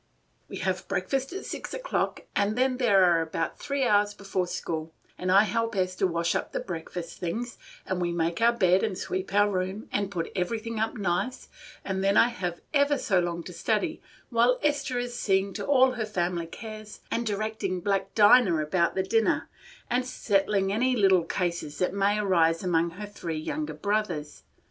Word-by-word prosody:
"We - - -6
have - - -2
breakfast 270 0 -1
at 385 - -6
six - - -5
o'clock, - - -2
and 205 +1 +1
then 255 0 +2
there 205 -7 +4
are 170 -2 +4
about 165 0 -3
three 280 -1 -1
hours 205 -3 +3
before 195 -3 -2
school, 160 -2 -4 0.2
and 185 0 -2
I 200 +2 +7
help 230 0 -1
Esther 185 0 +1
wash 170 -1 0
up - - -3
the - - -1
breakfast 170 -1 -6
things, 230 +8 -4 0.3
and 185 -1 -2
we 175 -1 0
make 170 +2 -1
our 235 +1 +6
bed 185 -5 +3
and 210 -5 -1
sweep 185 0 -3
our 205 +1 +4
room, 190 +2 -3
and 200 -1 0
put 175 -4 -4
everything 225 +4 -2
up 220 +2 -1
nice, 200 +5 -2 0.4
and 190 0 -2
then 195 +1 +3
I 235 - +6
have 180 -7 -4
ever 285 0 +3
so 190 -7 +2
long 170 -1 -2
to 180 - -9
study, 225 - -1 0.3
while 240 +2 +4
Esther 290 -4 0
is 245 0 -3
seeing 195 -3 +1
to - - -5
all 260 -2 +5
her 240 -3 -3
family 175 -4 -1
cares 215 +3 -9
and 235 - 0
directing 210 -3 -2
black 195 +1 -1
Dinah 205 -4 +6
about 170 +3 +1
the 190 - +1
dinner, 225 +3 +1 0.4
and 250 +1 +1
settling 195 -5 +1
any 255 +4 +2
little 190 -6 +4
cases 170 -4 -2
that 180 - 0
may 200 +1 +2
arise 170 -5 +2
among 170 -2 +2
her 210 - -5
three 175 -6 -5
younger 300 - -3
brothers. 200 -8 -2
200 Hz, 185 wpm, -27 LUFS, 180-230 Hz, 0.4 s, I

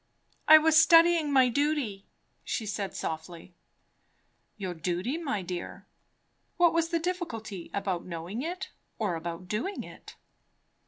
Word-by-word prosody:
"I 315 - +11
was 315 0 +5
studying 330 -2 +5
my 260 -2 +5
duty," 255 -7 -1 0.4
she 225 - -3
said 205 -1 -4
softly. 165 +2 -6 1.0
"Your 190 -3 -4
duty, 175 - -2
my 270 - -2
dear? 175 -1 -6 0.7
Was 335 -1 +3
the 335 - +1
difficulty 235 - -4
about 190 -3 -2
knowing 175 +6 -6
it, 360 +5 -5 0.3
or 210 -5 -1
about 170 +2 -6
doing 240 - -3
it?" - - -13
220 Hz, 120 wpm, -28 LUFS, -, 1.0 s, I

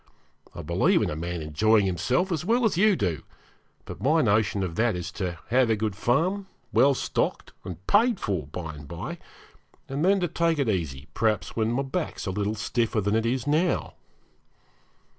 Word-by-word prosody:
I 85 - -6
believe 85 +3 +2
in - - -1
a - - -3
man 85 +1 -4
enjoying 105 +8 +3
himself 125 - 0
as 160 -3 -1
well 235 +5 +2
as 215 - +2
you 200 +3 +4
do, 90 - -1 0.6
but - - -9
my 155 +4 +3
notion 105 -2 +2
of 90 -3 -3
that 115 +3 +1
is 90 +1 -5
to 90 -3 -4
have 125 0 +3
a 110 - +3
good 105 -2 -2
farm, 175 - 0 0.3
well 140 0 +5
stocked - - -2
and 90 0 -8
paid 225 +1 +3
for, 90 -9 -2
by 80 +1 -6
and 75 -1 -11
by, 85 +2 -6 0.7
and 140 +3 -2
then 195 +2 +4
to 175 - +1
take 165 0 +1
it 140 -4 0
easy, 75 -9 -2
perhaps 110 -2 0
when 110 0 +1
my 130 +3 0
back 155 +5 -3
is - - -5
a 95 - -1
little 105 +2 -1
stiffer 115 +1 0
than 105 0 0
it 115 +1 +1
is 125 +1 -1
now.' 155 +4 +1
110 Hz, 195 wpm, -26 LUFS, 90-150 Hz, 0.7 s, well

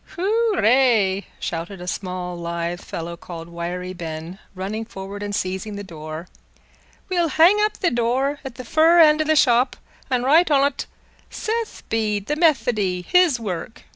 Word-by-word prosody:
"Hoorray!" 260 - +3
shouted 170 +3 -4
a 180 - -7
small 180 -1 -4
lithe 170 0 -4
fellow 170 +1 -6
called 170 -1 -9
Wiry 175 +2 -5
Ben, 165 +1 -7 0.2
running 200 +4 -4
forward 200 -2 -8
and 205 0 -3
seizing 190 +3 -3
the 205 - -6
door. 155 -1 -8 0.8
"We'll 350 -3 +1
hang 345 +7 +5
up 425 0 +2
th' 345 - -1
door 255 +5 0
at 265 -3 -8
fur 320 +6 +4
end 310 -1 +6
o' - - 0
th' 310 - +3
shop 245 -1 +4 0.3
an' 250 -2 +1
write 320 +6 +5
on't 280 -1 +2 0.4
'Seth 455 0 -4
Bede, 210 -3 0
the 295 - -1
Methody, 235 - +1
his 350 - +3
work. 190 -2 -5
215 Hz, 150 wpm, -22 LUFS, 180-300 Hz, 0.8 s, end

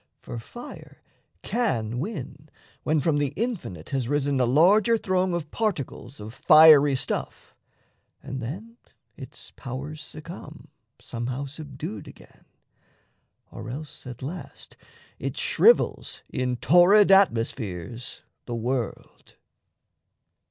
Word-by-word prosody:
For 120 - -7
fire 240 - -11 0.4
can 120 - -1
win 150 - -6 0.3
when 155 -1 +1
from 150 +1 +1
the 145 -1 -1
infinite 195 - -4
Has 130 -4 -1
risen 145 -1 +1
a 125 - +3
larger 200 - +5
throng 185 -3 0
of 155 -3 -5
particles 145 - -3
Of 105 +2 -8
fiery 155 -1 +7
stuff; - - -4 0.7
and 130 0 -5
then 200 - -7 0.4
its - - -11
powers 140 +4 -7
succumb, 160 +3 -10 0.3
Somehow 125 +4 -4
subdued 140 -7 -7
again, - - -16 1.1
or - - -8
else 145 +1 -8
at 125 0 -8
last 170 +7 -8 0.4
It - - -4
shrivels 475 +2 +3
in 125 -1 -1
torrid 180 - +6
atmospheres 115 - +1 0.2
the 120 - -4
world. 120 0 -4
145 Hz, 110 wpm, -25 LUFS, 125-175 Hz, 1.1 s, fiery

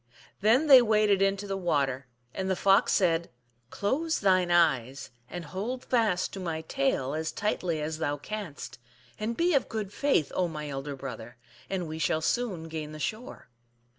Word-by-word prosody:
Then 230 +9 +4
they 270 -4 +9
waded 210 -3 +3
into 195 +1 +1
the 195 -1 -3
water, 140 -8 -1 0.3
and 190 0 -3
the 190 - +2
Fox 195 +1 +4
said, 170 -3 +2 0.2
" 115 0 -42
Close 300 - -1
thine 185 -3 +3
eyes 135 -7 +2 0.2
and 175 -1 -6
hold 220 +11 -5
fast 220 -7 +1
to 195 - -6
my 165 -3 -3
tail 160 - -1
as 160 +1 -2
tightly 185 -6 -1
as 155 +1 -4
thou 145 -2 -1
canst, 185 -4 -7 0.4
and 225 +2 -3
be 345 +1 +2
of 275 - +1
good 210 -3 -4
faith, 275 - +1
oh, 180 - +1
my 150 -2 -6
elder 140 +1 -5
brother, 125 -3 -8 0.3
and 185 -3 -2
we 155 +1 -6
shall 160 +1 +1
soon 200 -2 -1
gain 155 -1 -6
the 155 - -8
shore." 215 - -5
180 Hz, 175 wpm, -28 LUFS, 155-215 Hz, 0.4 s, they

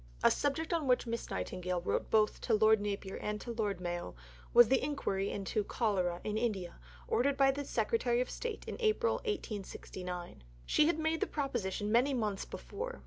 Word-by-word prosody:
A - - +7
subject 305 +4 0
on 320 -4 0
which 250 0 +3
Miss 230 0 -4
Nightingale 180 - -2
wrote - - -1
both 215 -1 +3
to 230 - +2
Lord 215 0 +5
Napier 200 -1 -3
and 210 0 -3
to 240 - -5
Lord 210 -5 -1
Mayo 175 - -4 0.4
was 240 -1 +8
the 265 +3 +3
inquiry 235 -9 -1
into 205 +1 -1
cholera 190 -6 0
in 215 0 -1
India 200 - -2 0.3
ordered 275 +3 +2
by 270 -1 +5
the 285 +1 -4
Secretary 235 -1 +1
of 250 - +1
State 470 -3 -5
in - - -4
April 465 +1 +2
1869. 185 - -5 0.2
She 305 - +4
had 335 - +2
made 320 0 0
the - - 0
proposition 215 -8 -2
many 255 +4 +4
months 210 -5 -1
before. 485 +4 -6
225 Hz, 180 wpm, -33 LUFS, 195-275 Hz, 0.4 s, was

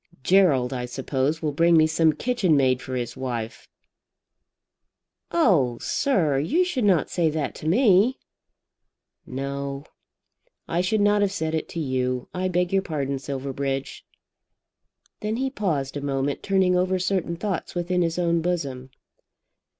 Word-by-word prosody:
Gerald, 140 -8 +3
I 125 -1 -3
suppose, 135 +5 -2
will 150 - 0
bring 170 +3 +4
me 155 - +6
some 160 0 +3
kitchen 215 - +1
maid 130 -2 +2
for 130 - -5
his 120 -2 -3
wife." 120 -3 -5 1.6
"Oh, 165 - +2
sir, 165 - +1
you 315 - +2
should 265 -11 -1
not 185 -6 +2
say 170 -3 +2
that 150 -4 -2
to 155 - -6
me." 215 - +4 1.1
"No; 140 +1 -4 0.8
I 170 - 0
should 205 +4 +1
not 205 0 +3
have 200 -1 +2
said 160 -5 -2
it 160 - -2
to 170 - -5
you. 130 -3 -2
I 185 +1 -1
beg 180 0 0
your 195 - +3
pardon, 140 -6 -3
Silverbridge." 135 0 -4 1.2
Then 215 +1 -2
he 265 +2 -1
paused 150 - -2
a 145 - -3
moment, 140 0 -2
turning 190 -2 +2
over 185 +1 +1
certain 185 -2 -1
thoughts 190 0 -4
within 180 +1 0
his 165 -1 0
own 170 -1 +1
bosom. 140 -7 -3
160 Hz, 145 wpm, -24 LUFS, 135-185 Hz, 1.6 s, me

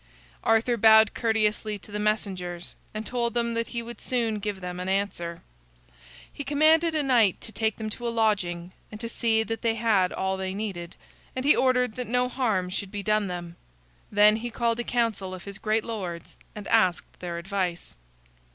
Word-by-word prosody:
Arthur 230 +2 +3
bowed 220 0 +7
courteously 215 -2 0
to 200 +2 -15
the 210 - -3
messengers, 185 -5 -2 0.2
and 215 +1 -5
told 240 -1 -1
them 235 -1 +1
that 230 0 -1
he 235 -1 -4
would 235 +1 -9
soon 230 -4 0
give 205 -1 -3
them 180 -1 -6
an 180 +1 -3
answer. 180 -4 -2 0.9
He 285 - -5
commanded 315 +3 +4
a 305 - +2
knight 235 -8 +3
to 225 - -4
take 220 -1 0
them 220 - -4
to 240 +3 -5
a - - +1
lodging, 190 -6 0 0.2
and 215 - -8
to 230 - -4
see 225 -1 +1
that 225 0 -4
they 230 -1 +1
had 215 -5 +2
all 190 0 -1
they 190 0 -3
needed, 190 -5 -5 0.4
and 255 +1 -3
he 295 - +6
ordered 250 -3 +2
that 250 - -3
no 250 +1 +1
harm 220 -8 0
should 195 +1 -3
be 205 0 -5
done 215 +1 +2
them. 175 -1 -6 0.5
Then 210 +1 +6
he 240 +2 -4
called 235 0 0
a - - 0
council 220 -6 -1
of 185 - -11
his 200 0 -8
great 215 0 +1
lords 185 -7 -6 0.2
and 210 -2 -7
asked 185 -6 +2
their 175 -1 -4
advice. 180 -1 -3
215 Hz, 190 wpm, -26 LUFS, 190-235 Hz, 0.9 s, bowed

